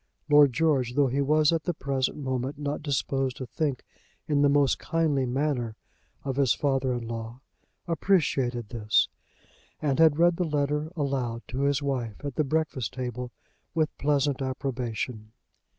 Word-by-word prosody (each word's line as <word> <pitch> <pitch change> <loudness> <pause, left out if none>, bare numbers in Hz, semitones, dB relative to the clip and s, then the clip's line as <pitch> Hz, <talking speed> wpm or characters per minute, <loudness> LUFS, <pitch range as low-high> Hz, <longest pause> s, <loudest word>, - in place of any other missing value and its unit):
Lord 145 -2 +7
George, 135 -4 +1
though 145 -1 +4
he 135 +3 0
was 150 +2 +3
at 165 -1 -1
the 175 - -1
present 135 -2 -1
moment 130 0 -3
not 145 0 -3
disposed 135 -3 -1
to 130 - -5
think 135 +3 -2 0.4
in 145 -2 +2
the 145 - +5
most 140 -1 +3
kindly 150 -4 +1
manner 125 -4 -1 0.5
of 135 -1 -3
his 135 -5 +3
father 135 -2 0
in 120 -1 -5
law, 115 +2 -6 0.5
appreciated 135 - +1
this, 110 -3 +2 0.7
and 145 -1 0
had 160 -2 +6
read 170 0 +4
the 180 - +1
letter 150 0 -1
aloud 130 -6 -2
to 130 +3 -3
his 140 0 +1
wife 125 -6 -2
at 140 - -3
the 155 - +1
breakfast 145 -6 -1
table 125 -1 -4 0.4
with 155 -1 +1
pleasant 140 -1 +1
approbation. 125 -4 -3
140 Hz, 155 wpm, -27 LUFS, 125-150 Hz, 0.7 s, Lord